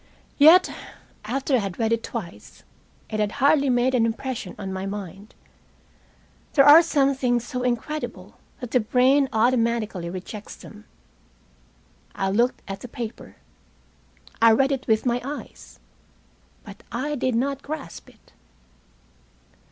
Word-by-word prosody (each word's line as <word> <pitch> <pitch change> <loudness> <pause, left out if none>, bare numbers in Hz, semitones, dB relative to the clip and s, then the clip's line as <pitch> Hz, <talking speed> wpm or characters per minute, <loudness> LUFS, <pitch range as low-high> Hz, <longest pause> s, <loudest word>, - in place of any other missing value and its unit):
Yet, 325 +6 +7 0.5
after 270 +5 -2
I - - +6
had 195 -4 -5
read 225 -1 +1
it 230 - -1
twice, 175 - -8 0.5
it 215 - -2
had 210 0 0
hardly 280 0 +3
made 250 +1 +2
an 245 -3 +3
impression 230 -4 -5
on 195 -2 -6
my 190 +1 -4
mind. 195 0 -8 1.2
There 275 -2 +5
are 295 +3 +9
some 280 -4 +1
things 245 -3 0
so 250 0 -4
incredible 250 +5 -4 0.2
that 245 -2 -7
the 250 - +3
brain 260 +5 +3
automatically 225 -6 0
rejects 190 +4 -8
them. 215 0 -14 1.3
I 195 -1 -1
looked 240 +5 0
at 195 0 -6
the 250 - -9
paper. 235 -1 -8 1.1
I 230 -1 +7
read 270 +4 +2
it 270 -1 -3
with 220 0 +1
my 245 0 0
eyes. 285 +3 -9 0.8
But 200 -2 -12
I 275 +5 -3
did 260 -3 -1
not 275 +3 -1
grasp 290 - -8
it. - - -25
240 Hz, 135 wpm, -23 LUFS, 215-270 Hz, 1.3 s, are